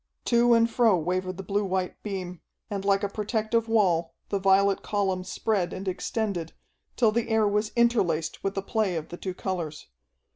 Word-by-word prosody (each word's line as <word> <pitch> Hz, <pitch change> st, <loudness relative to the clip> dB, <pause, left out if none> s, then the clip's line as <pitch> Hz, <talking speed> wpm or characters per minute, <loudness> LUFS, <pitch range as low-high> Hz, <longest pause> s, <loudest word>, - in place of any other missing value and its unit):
To 235 Hz, 0 st, +4 dB
and 230 Hz, 0 st, +4 dB
fro 230 Hz, -4 st, +3 dB
wavered 185 Hz, +2 st, -2 dB
the 195 Hz, -, -6 dB
blue 200 Hz, +2 st, 0 dB
white 185 Hz, -1 st, -2 dB
beam, 185 Hz, -4 st, -5 dB, 0.3 s
and 200 Hz, -1 st, -3 dB
like 200 Hz, 0 st, +2 dB
a -, -, +2 dB
protective 220 Hz, +2 st, -1 dB
wall 175 Hz, -7 st, +2 dB
the 200 Hz, -, 0 dB
violet 195 Hz, +1 st, +3 dB
column 190 Hz, -3 st, -1 dB
spread 190 Hz, -2 st, -1 dB
and 190 Hz, +1 st, -6 dB
extended, 185 Hz, -2 st, -2 dB, 0.4 s
till 230 Hz, -3 st, +4 dB
the 235 Hz, +2 st, -1 dB
air 220 Hz, -1 st, +3 dB
was 210 Hz, +1 st, 0 dB
interlaced 185 Hz, -10 st, +1 dB
with 195 Hz, 0 st, -1 dB
the 195 Hz, -, -2 dB
play 210 Hz, -4 st, 0 dB
of 160 Hz, -2 st, -4 dB
the 175 Hz, -, -7 dB
two 185 Hz, -1 st, -5 dB
colors. 170 Hz, -6 st, -4 dB
195 Hz, 180 wpm, -27 LUFS, 185-220 Hz, 0.4 s, To